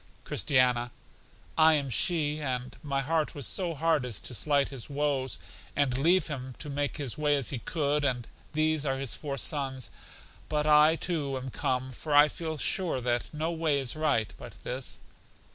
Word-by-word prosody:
Christiana: 125 Hz, -3 st, +2 dB, 0.7 s
I 160 Hz, 0 st, +7 dB
am 140 Hz, -3 st, -1 dB
she, 150 Hz, -, +1 dB
and 125 Hz, -3 st, -3 dB
my 140 Hz, -2 st, -1 dB
heart 155 Hz, +2 st, 0 dB
was 140 Hz, -3 st, -4 dB
so 175 Hz, -4 st, -1 dB
hard 160 Hz, -1 st, +2 dB
as 125 Hz, -4 st, -2 dB
to -, -, -7 dB
slight 140 Hz, +3 st, +2 dB
his 135 Hz, -2 st, -6 dB
woes, 140 Hz, -2 st, -1 dB, 0.4 s
and 140 Hz, -3 st, +2 dB
leave 165 Hz, +6 st, +4 dB
him 130 Hz, -4 st, -5 dB
to 150 Hz, -, -5 dB
make 145 Hz, 0 st, -1 dB
his 145 Hz, -1 st, -3 dB
way 150 Hz, -1 st, +3 dB
as 140 Hz, -4 st, +1 dB
he 130 Hz, -, -3 dB
could; 150 Hz, +2 st, 0 dB
and 125 Hz, -4 st, 0 dB, 0.3 s
these 155 Hz, -1 st, +2 dB
are 135 Hz, -2 st, 0 dB
his 135 Hz, -2 st, -2 dB
four 140 Hz, -2 st, -4 dB
sons. 135 Hz, -3 st, -2 dB, 0.6 s
But 150 Hz, -1 st, 0 dB
I, 150 Hz, +1 st, +6 dB
too, 150 Hz, -6 st, -1 dB
am 130 Hz, 0 st, -6 dB
come, 130 Hz, +2 st, -1 dB
for 145 Hz, +4 st, -2 dB
I 145 Hz, +1 st, +8 dB
feel 160 Hz, -1 st, -4 dB
sure 175 Hz, -1 st, +1 dB
that 120 Hz, -1 st, -1 dB
no 155 Hz, +2 st, -2 dB
way 160 Hz, -4 st, +1 dB
is 135 Hz, 0 st, -3 dB
right 145 Hz, -9 st, +1 dB
but -, -, -11 dB
this. 125 Hz, +1 st, -4 dB
145 Hz, 180 wpm, -29 LUFS, 130-155 Hz, 0.7 s, I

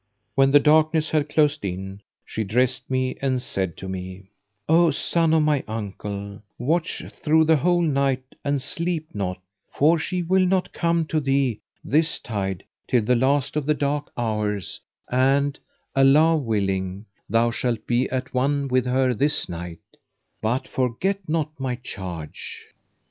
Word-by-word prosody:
When 135 Hz, 0 st, +4 dB
the 145 Hz, +1 st, +7 dB
darkness 155 Hz, +1 st, +3 dB
had 150 Hz, -1 st, +1 dB
closed 150 Hz, -1 st, +2 dB
in, 95 Hz, +1 st, -5 dB, 0.2 s
she 110 Hz, -, -3 dB
dressed 125 Hz, +5 st, 0 dB
me 130 Hz, 0 st, -1 dB
and 130 Hz, -2 st, +1 dB
said 95 Hz, -8 st, -1 dB
to 95 Hz, -, -7 dB
me, 95 Hz, +1 st, -7 dB, 0.4 s
"O 165 Hz, +1 st, +5 dB
son 165 Hz, +2 st, +1 dB
of 160 Hz, -1 st, +4 dB
my 150 Hz, -3 st, +1 dB
uncle, 100 Hz, -2 st, -6 dB, 0.2 s
watch 160 Hz, +7 st, 0 dB
through 160 Hz, +1 st, +2 dB
the 160 Hz, 0 st, +4 dB
whole 175 Hz, +3 st, +2 dB
night 135 Hz, -3 st, 0 dB
and 140 Hz, -1 st, 0 dB
sleep 160 Hz, +3 st, -1 dB
not; 95 Hz, -3 st, -3 dB, 0.3 s
for 160 Hz, +4 st, +3 dB
she 180 Hz, +2 st, -1 dB
will 185 Hz, +2 st, +3 dB
not 185 Hz, 0 st, 0 dB
come 170 Hz, -1 st, +1 dB
to 155 Hz, 0 st, 0 dB
thee 135 Hz, -5 st, +1 dB, 0.2 s
this 155 Hz, +2 st, +2 dB
tide 95 Hz, -4 st, -4 dB, 0.2 s
till 120 Hz, -3 st, +2 dB
the 125 Hz, +4 st, +2 dB
last 135 Hz, +3 st, +1 dB
of 150 Hz, -2 st, -1 dB
the 150 Hz, -, +3 dB
dark 145 Hz, 0 st, -2 dB
hours 105 Hz, -4 st, -2 dB, 0.3 s
and, 135 Hz, +3 st, +2 dB, 0.4 s
Allah 145 Hz, +5 st, +5 dB
willing, 100 Hz, -6 st, -1 dB, 0.2 s
thou 115 Hz, +2 st, +3 dB
shalt 120 Hz, -1 st, -2 dB
be 120 Hz, +2 st, +1 dB
at 130 Hz, 0 st, -3 dB
one 140 Hz, +2 st, 0 dB
with 130 Hz, 0 st, +1 dB
her 130 Hz, 0 st, +2 dB
this 145 Hz, +6 st, +2 dB
night; 85 Hz, -1 st, -7 dB, 0.6 s
but 120 Hz, +4 st, -1 dB
forget 135 Hz, +11 st, -1 dB
not 155 Hz, -1 st, 0 dB
my 130 Hz, -2 st, -2 dB
charge." 90 Hz, -, -7 dB
130 Hz, 155 wpm, -23 LUFS, 110-155 Hz, 0.6 s, the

